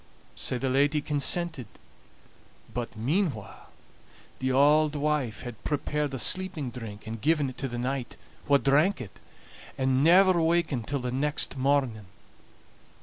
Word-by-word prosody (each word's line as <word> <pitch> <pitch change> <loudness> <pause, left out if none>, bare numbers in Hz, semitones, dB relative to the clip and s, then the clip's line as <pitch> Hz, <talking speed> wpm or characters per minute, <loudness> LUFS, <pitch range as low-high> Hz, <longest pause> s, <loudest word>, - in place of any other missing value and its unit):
So 125 - -3
the 135 - -2
lady 140 +3 +2
consented; 150 - -1 1.1
but 120 -2 -5
meanwhile 135 - -2 0.7
the 130 0 -1
auld 150 +3 +4
wife 145 -6 -1
had 120 -4 -9
prepared 150 0 -2
a - - -3
sleeping 160 -2 +1
drink, 110 -5 -9
and 110 0 -6
given 150 -2 +1
it - - -16
to 135 - -2
the 120 -1 -6
knight, 130 +1 -3 0.3
wha 140 -1 +5
drank 150 +8 +2
it, 115 -6 -10 0.6
and 130 0 +1
never 180 +1 +5
wakened 160 -7 0
till 140 -2 -2
next 135 +5 +1
morning. 130 -6 0
140 Hz, 135 wpm, -27 LUFS, 125-150 Hz, 1.1 s, wha